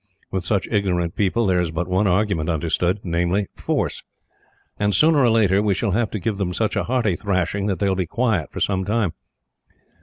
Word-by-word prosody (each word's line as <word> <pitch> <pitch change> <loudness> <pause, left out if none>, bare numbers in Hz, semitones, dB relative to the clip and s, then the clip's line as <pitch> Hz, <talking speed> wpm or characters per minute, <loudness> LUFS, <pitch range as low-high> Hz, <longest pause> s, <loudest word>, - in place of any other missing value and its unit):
With 95 -1 -2
such 100 0 0
ignorant 90 -5 0
people, 105 +3 +1
there 90 -2 +2
is 85 - -1
but 80 +2 -3
one 95 +3 +1
argument 90 -4 +1
understood 85 +4 0
namely, 90 +3 0
force; - - -2 0.8
and 105 -1 +1
sooner 155 - +4
or 125 -3 +4
later 105 -3 +3
we 105 -2 +1
shall 105 +1 -1
have 115 +3 +1
to 105 - -4
give 100 +3 -2
them 90 -3 -2
such 110 -2 0
a - - 0
hearty 115 -6 +1
thrashing 100 +1 -1
that 95 -3 0
they 100 - 0
will 95 - +1
be 90 -2 -2
quiet 110 - 0
for - - -6
some 95 -1 0
time. 105 -3 0
100 Hz, 205 wpm, -22 LUFS, 90-105 Hz, 0.8 s, sooner